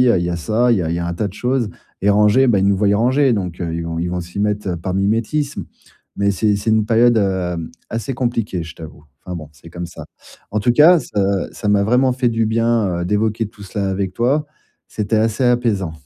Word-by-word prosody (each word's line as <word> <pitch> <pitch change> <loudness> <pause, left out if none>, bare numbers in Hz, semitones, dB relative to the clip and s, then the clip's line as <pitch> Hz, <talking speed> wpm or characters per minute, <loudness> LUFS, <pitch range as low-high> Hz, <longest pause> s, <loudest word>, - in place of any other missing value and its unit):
y 125 - +4
a 95 - +3
il 85 - -1
y - - -2
a 85 - -2
ça, 110 +9 +1
il - - +3
y - - 0
a 80 - -2
il - - -1
y - - -2
a 85 - -2
un 85 - -2
tas 100 +4 -2
de - - -11
choses 125 +1 -1 0.3
et 100 - +2
ranger 105 +6 +4
ben 115 -5 +3
ils 95 - +2
nous 100 0 +3
voient 100 +1 +2
ranger 130 +4 +3
donc, 90 -4 -4
heu, 85 -1 -3
ils 85 - -3
vont 85 0 -4
ils 85 +1 -1
vont 90 0 -2
s'y 90 +3 -9
mettre, 105 -1 -1
heu, 90 - -1
par 90 +2 -4
mimétisme. 115 +9 -1 0.5
Mais 100 0 +2
c'est 105 +1 +1
c'est 105 +3 -1
une 110 -1 +3
période, 120 +1 +4
hem, 90 -4 -1 0.2
assez 115 +3 -3
compliquée, 115 -8 -2
je 85 0 -9
t'avoue. 75 -2 -11 0.2
Enfin 90 - -6
bon, 80 -3 -8
c'est 75 +3 -16
comme 90 +1 -6
ça. 85 - -10 0.5
En 105 - -1
tout 120 +3 +2
cas, 160 +7 +7
ça 105 - -3 0.3
ça 105 - -4
m'a 100 -1 +3
vraiment 125 +4 +3
fait 125 -1 +1
du 115 0 0
bien, 110 -5 +1
heu, - - -2
d'évoquer 110 +2 0
tout 100 - -14
cela 100 0 -3
avec 95 -1 -2
toi, 140 +7 +1 0.4
c'était 110 +1 -1
assez 110 +3 +1
apaisant. 115 -8 +1
105 Hz, 255 wpm, -19 LUFS, 90-115 Hz, 0.5 s, cas